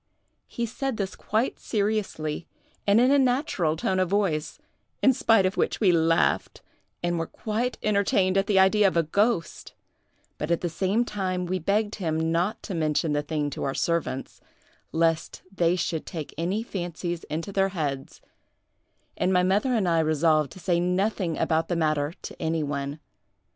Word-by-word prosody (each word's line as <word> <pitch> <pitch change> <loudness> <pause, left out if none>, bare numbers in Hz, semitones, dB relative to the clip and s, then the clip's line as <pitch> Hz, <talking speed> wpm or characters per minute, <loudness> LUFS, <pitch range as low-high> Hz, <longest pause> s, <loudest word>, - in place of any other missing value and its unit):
He 235 - -3
said 255 +1 -3
this 195 -2 -3
quite 220 +5 -1
seriously, 200 -8 -2 0.4
and 200 +2 +5
in 250 +2 +4
a 285 - +5
natural 250 - +1
tone 185 +3 0
of 185 -2 +1
voice, 185 -6 0 0.5
in 265 - +6
spite 225 -7 +3
of 185 +2 -1
which - - 0
we 195 -5 +4
laughed, 165 -1 +1 0.4
and 175 -1 0
were 165 - -2
quite 230 +3 -3
entertained 200 -2 +2
at 195 0 +2
the 200 - +2
idea 195 +2 +5
of 185 - 0
a 165 - +4
ghost; 200 +2 -1 0.6
but 150 - -3
at 170 - +1
the 175 - -1
same 195 +8 +1
time 185 -4 -2
we 185 +1 -1
begged 205 +5 0
him 160 -3 -1
not 175 +5 0
to 200 - -5
mention 155 -1 0
the 145 - +1
thing 150 -1 -2
to - - -5
our 135 -1 -2
servants, 170 -5 -2 0.5
lest 165 0 0
they 170 -1 +3
should 165 -2 -2
take 160 -4 -6
any 185 +7 -1
fancies 175 -4 -4
into 165 +6 -4
their 195 0 +2
heads; 145 -7 -4 0.9
and 185 - +1
my 180 -1 +3
mother 200 +8 +2
and 205 -5 +1
I 165 -1 +3
resolved 155 -1 +2
to - - -12
say 175 -1 +1
nothing 180 -1 0
about 160 0 +1
the 175 - -1
matter 155 -1 0
to - - -8
any 160 -1 0
one. 140 0 -3
180 Hz, 175 wpm, -26 LUFS, 160-200 Hz, 0.9 s, in